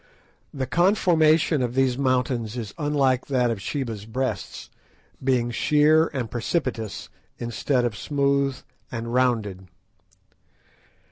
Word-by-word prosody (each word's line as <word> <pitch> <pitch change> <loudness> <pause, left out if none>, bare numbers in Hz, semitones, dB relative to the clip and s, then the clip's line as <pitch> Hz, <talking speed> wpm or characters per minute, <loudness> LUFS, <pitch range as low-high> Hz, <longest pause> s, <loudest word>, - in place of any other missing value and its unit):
The 135 -2 -3
conformation 165 - +3
of 120 0 -2
these 130 -2 +2
mountains 125 -3 0
is 110 -4 -5
unlike 140 -4 +1
that 125 -3 +1
of 105 -4 -4
Sheba's 110 -3 -4
Breasts, 130 +3 -4 0.5
being 125 -2 +1
sheer 150 +5 +4
and 130 -5 -4
precipitous, 120 - -3 0.3
instead 120 +2 -1
of 115 -3 -2
smooth 140 +1 0 0.3
and 115 0 -4
rounded. 110 -7 0
130 Hz, 110 wpm, -24 LUFS, 115-145 Hz, 0.5 s, sheer